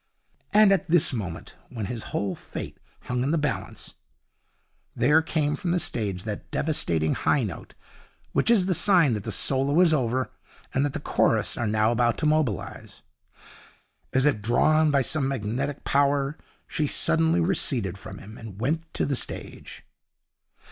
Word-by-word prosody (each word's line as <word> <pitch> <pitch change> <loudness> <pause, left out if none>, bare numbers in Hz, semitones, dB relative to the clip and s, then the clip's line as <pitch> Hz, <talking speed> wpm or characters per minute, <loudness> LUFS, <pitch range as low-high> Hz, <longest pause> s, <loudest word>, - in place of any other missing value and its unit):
And 210 -1 +6
at 190 -3 +1
this 170 -4 +3
moment, 90 -8 -6
when 115 -5 -5
his 115 +2 -6
whole 100 -2 -2
fate - - -8 0.2
hung 125 0 -3
in 135 - 0
the 165 - +1
balance, 150 -6 -4 1.0
there 150 +6 +4
came 150 -2 -1
from 185 -4 -4
the 175 +1 +1
stage 100 - -3
that 105 -2 -6
devastating 85 - 0
high - - +1
note - - -7 0.6
which - - +1
is 215 -6 +4
the 185 - +1
sign 175 - +4
that 105 -2 -4
the 110 - -3
solo 135 - +2
is 175 -3 +5
over 130 -2 0 0.4
and 135 - +1
that 145 - -1
the - - -3
chorus - - +1
are 120 - -2
now 110 +1 +2
about 120 0 +1
to 155 - -2
mobilize. 150 - -2 1.1
As 130 +1 +2
if 140 -8 +2
drawn 155 +8 +3
by 140 -2 +2
some 145 0 +1
magnetic 135 +3 -3
power, 140 0 +1 0.3
she 150 - -1
suddenly 165 +3 +2
receded 130 - +1
from 100 - -10
him, 110 +3 -12
and 105 -4 -10
went 145 +8 0
on 165 - -26
to - - 0
the 140 - -1
stage. - - -6
135 Hz, 165 wpm, -25 LUFS, 110-155 Hz, 1.1 s, And